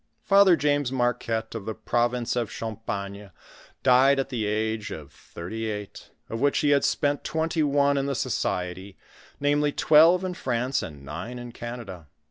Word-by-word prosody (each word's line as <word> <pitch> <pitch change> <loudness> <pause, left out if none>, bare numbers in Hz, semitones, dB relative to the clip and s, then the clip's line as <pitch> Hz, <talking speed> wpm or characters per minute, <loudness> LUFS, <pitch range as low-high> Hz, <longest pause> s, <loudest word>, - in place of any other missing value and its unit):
Father 195 -2 +6
James 145 -3 +1
Marquette, 120 -3 -1
of 110 -4 -6
the 110 -1 -4
province 120 0 0
of 120 -3 -1
Champagne, 100 -3 -5 0.5
died 130 +2 +5
at 135 0 -1
the 115 -5 -2
age 110 0 -1
of 75 -2 -8
thu*ty 110 +7 -7
eight, 105 -1 -7 0.2
of 115 +1 -5
which 145 0 +2
he 145 - +3
had 140 -1 +4
spent 145 -2 0
twenty 160 0 -1
one 140 -1 +2
in 135 - -1
the 140 - -1
society, 95 -3 -3 0.4
namely 145 +1 +2
twelve 165 +5 +5
in 185 -1 -2
France, 125 -4 -1
and 70 -3 -9
nine 85 - -6
in 120 0 -8
Canada. 115 -9 -8
120 Hz, 160 wpm, -26 LUFS, 110-145 Hz, 0.5 s, Father